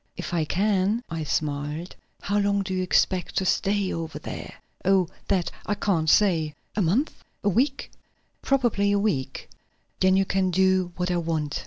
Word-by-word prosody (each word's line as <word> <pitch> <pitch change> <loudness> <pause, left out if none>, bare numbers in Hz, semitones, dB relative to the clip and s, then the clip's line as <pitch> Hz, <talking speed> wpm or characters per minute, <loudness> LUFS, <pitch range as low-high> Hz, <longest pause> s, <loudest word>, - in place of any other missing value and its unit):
"If 175 -1 -5
I 165 -2 +1
can," 200 +5 +1
I 165 -1 -2
smiled. 150 +3 -2 0.3
"How 205 +1 0
long 200 0 +1
do 190 -1 -4
you 185 - 0
expect 185 0 +1
to 190 - +1
stay 200 +1 +1
over 165 -1 -4
there?" - - -7 0.3
"Oh, 190 -2 +3 0.2
that 185 -4 +1 0.2
I 210 - +1
can't 175 -6 +1
say." 160 -6 +3 0.2
"A 210 - +1
month? 205 - 0 0.2
a 205 - +3
week?" 265 +8 0 0.5
"Probably 240 -7 +2
a 205 - +3
week." 140 -11 -1 0.5
"Then 190 0 +4
you 195 - +3
can 190 -1 +1
do 185 0 +2
what 180 0 -1
I 175 - +1
want. 160 -3 -2
185 Hz, 170 wpm, -25 LUFS, 165-200 Hz, 0.5 s, Then